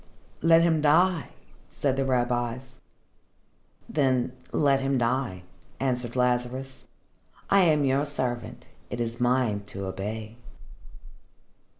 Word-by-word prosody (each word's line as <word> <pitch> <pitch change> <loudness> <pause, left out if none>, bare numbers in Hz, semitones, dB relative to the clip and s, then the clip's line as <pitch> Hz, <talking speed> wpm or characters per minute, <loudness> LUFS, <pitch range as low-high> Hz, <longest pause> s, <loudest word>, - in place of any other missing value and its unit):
"Let 165 0 +6
him 160 -2 +2
die," 165 +3 +3 0.4
said 135 -2 -1
the 135 0 0
rabbis. 125 0 -1 1.1
"Then 130 -5 +1 0.2
let 140 -2 +2
him 135 0 +1
die," 120 -6 -1 0.4
answered 125 -3 -1
Lazarus. 125 +1 -1 0.7
"I 200 - +6
am 150 -3 +3
your 135 +2 +1
servant. 125 -4 -3 0.2
It 120 - -5
is 115 0 -3
mine 120 -4 +1
to 100 -1 -6
obey." 105 +4 -5
130 Hz, 105 wpm, -26 LUFS, 120-140 Hz, 1.1 s, Let